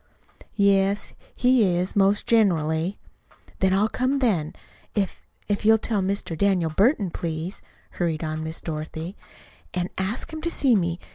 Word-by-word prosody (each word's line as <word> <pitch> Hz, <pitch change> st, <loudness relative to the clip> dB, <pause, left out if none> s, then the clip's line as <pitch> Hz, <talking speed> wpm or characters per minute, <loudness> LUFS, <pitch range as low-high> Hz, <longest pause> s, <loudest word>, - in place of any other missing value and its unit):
"Yes, 200 Hz, 0 st, +2 dB, 0.2 s
he 250 Hz, -1 st, +4 dB
is, 180 Hz, +2 st, -1 dB
most 200 Hz, +1 st, +3 dB
generally." 175 Hz, -5 st, +2 dB, 0.6 s
"Then 190 Hz, -1 st, +3 dB
I'll 200 Hz, +3 st, +3 dB
come 255 Hz, +4 st, 0 dB
then. 195 Hz, -, 0 dB, 0.4 s
If 200 Hz, -3 st, -2 dB, 0.2 s
if 205 Hz, 0 st, -1 dB
you'll 220 Hz, +1 st, +6 dB
tell 220 Hz, -2 st, -1 dB
Mr. 190 Hz, -3 st, -2 dB
Daniel 180 Hz, -2 st, +1 dB
Burton, 200 Hz, -, +2 dB
please," 165 Hz, +3 st, -4 dB, 0.3 s
hurried 165 Hz, -3 st, -2 dB
on 155 Hz, 0 st, -3 dB
Miss 160 Hz, +1 st, -5 dB
Dorothy, 160 Hz, +3 st, -5 dB, 0.6 s
"and 180 Hz, 0 st, -2 dB
ask 205 Hz, +11 st, -3 dB
him 315 Hz, -, -5 dB
to 335 Hz, -, -1 dB
see 270 Hz, -7 st, +3 dB
me. 170 Hz, -3 st, 0 dB
195 Hz, 145 wpm, -24 LUFS, 165-215 Hz, 0.6 s, you'll